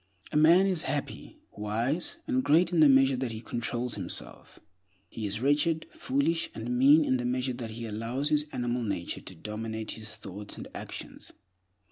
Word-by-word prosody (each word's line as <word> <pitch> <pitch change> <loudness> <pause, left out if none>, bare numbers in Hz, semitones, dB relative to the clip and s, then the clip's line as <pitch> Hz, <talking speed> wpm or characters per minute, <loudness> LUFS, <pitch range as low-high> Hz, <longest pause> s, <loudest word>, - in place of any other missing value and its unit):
A - - -6
man 165 +5 +6
is 185 -4 +1
happy, 145 0 -4
wise, 120 - -2
and 260 -3 +1
great 170 - +4
in 175 - +2
the 150 -2 +8
measure 135 0 +5
that 125 -2 -2
he 110 - -5
controls 120 +1 -3
himself; 95 -4 -4 0.5
he 110 -2 -5
is 105 +3 -3
wretched, 150 +4 +2
foolish, 140 +5 0
and 120 +2 -3
mean 145 +5 +6
in 130 - +2
the 125 - -3
measure 125 +1 0
that 120 -2 -6
he 115 +1 -6
allows 115 +6 -2
his 150 0 +2
animal 120 0 -1
nature 100 -6 -3
to - - -9
dominate 110 +3 -5
his 110 -1 -7
thoughts 100 +2 -7
and - - -7
actions. - - -8
125 Hz, 175 wpm, -29 LUFS, 110-150 Hz, 0.5 s, the